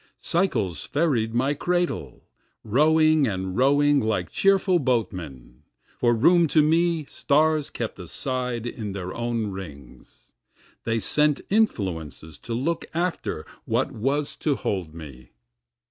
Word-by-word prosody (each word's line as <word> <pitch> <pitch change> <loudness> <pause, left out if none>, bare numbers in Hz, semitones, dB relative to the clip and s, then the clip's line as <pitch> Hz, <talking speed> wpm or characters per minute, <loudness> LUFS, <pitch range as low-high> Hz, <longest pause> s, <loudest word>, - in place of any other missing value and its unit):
Cycles 115 - -1
ferried 125 -8 0
my 130 +4 +2
cradle, 175 - -2 0.4
rowing 155 +4 +4
and 95 -2 -3
rowing 145 +3 +4
like 105 -8 -1
cheerful 195 -2 +3
boatmen, 90 - -3 0.4
For 120 -1 +3
room 170 +8 +4
to 155 0 +4
me 165 0 +2
stars 155 +1 +1
kept 115 -4 -5
aside 125 +5 -3
in 110 -4 -5
their 95 -2 -5
own 115 -3 -2
rings, 75 -10 -11 0.5
They 115 0 0
sent 150 +7 +2
influences 80 - -1
to 115 - -5
look 155 +8 -1
after 170 - -2 0.2
what 120 +5 0
was 135 +5 -1
to 150 -3 0
hold 90 -10 -3
me. 70 -6 -11
120 Hz, 120 wpm, -24 LUFS, 95-155 Hz, 0.5 s, rowing